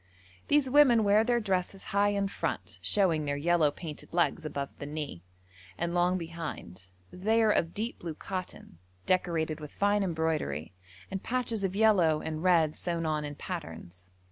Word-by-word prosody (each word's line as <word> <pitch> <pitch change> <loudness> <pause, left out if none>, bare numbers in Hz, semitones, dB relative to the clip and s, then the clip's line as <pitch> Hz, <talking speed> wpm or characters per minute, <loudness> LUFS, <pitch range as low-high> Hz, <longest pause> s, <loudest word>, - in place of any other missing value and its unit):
These 290 -2 +3
women 255 -4 +6
wear 205 +1 +5
their 240 0 +2
dresses 190 -2 -2
high 200 +1 +4
in 200 -1 0
front - - -4
(showing 170 -7 +2
their 145 0 -1
yellow 165 0 +3
painted 150 0 -8
legs 170 -2 +1
above 140 -2 -4
the 140 - -5
knee) 145 - -5 0.6
and 170 0 -2
long 175 +1 +2
behind; 165 - -7 0.3
they 220 +5 +1
are 215 - +4
of 165 -4 0
deep 225 +3 -3
blue 165 -3 -5
cotton, 185 - -7 0.3
decorated 165 -4 0
with 150 -1 -8
fine 205 +1 +2
embroidery, 160 - -1 0.4
and 190 -1 -3
patches 235 -4 -1
of 190 0 -1
yellow 190 -8 +4
and 155 0 -4
red 165 -4 +3
sewn 170 -2 -2
on 155 -1 0
in 145 0 -5
patterns. 90 - -8
175 Hz, 165 wpm, -29 LUFS, 155-200 Hz, 0.6 s, women